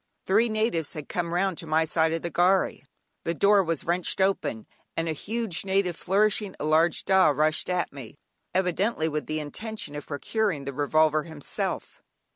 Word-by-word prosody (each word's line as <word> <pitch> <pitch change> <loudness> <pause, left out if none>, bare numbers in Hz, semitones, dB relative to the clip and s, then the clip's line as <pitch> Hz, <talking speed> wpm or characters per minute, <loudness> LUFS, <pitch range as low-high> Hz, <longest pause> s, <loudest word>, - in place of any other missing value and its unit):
Three 220 +5 +3
natives 215 -8 0
had 150 -2 -7
come 170 -1 -2
round 180 0 0
to 165 - -7
my 160 +1 +2
side 160 0 +1
of 165 0 -2
the 170 - -3
gharry, 185 0 +2 0.4
the 170 - -1
door 200 +4 +5
was 165 -3 -2
wrenched 175 +2 0
open, 190 - 0 0.3
and 165 0 0
a 160 - 0
huge 215 +2 -3
native 190 -2 +1
flourishing 205 +2 +1
a - - -3
large 160 +2 +2
"dah" 190 -1 +5
rushed 150 +3 +1
at 180 -4 -1
me, 135 -2 -10 0.3
evidently 185 -1 0
with 150 -1 -3
the 155 0 -2
intention 155 +1 -5
of 145 - -7
procuring 160 +1 -1
the 140 0 -5
revolver 155 +2 +2
himself. 160 -4 -4
170 Hz, 175 wpm, -26 LUFS, 155-195 Hz, 0.4 s, door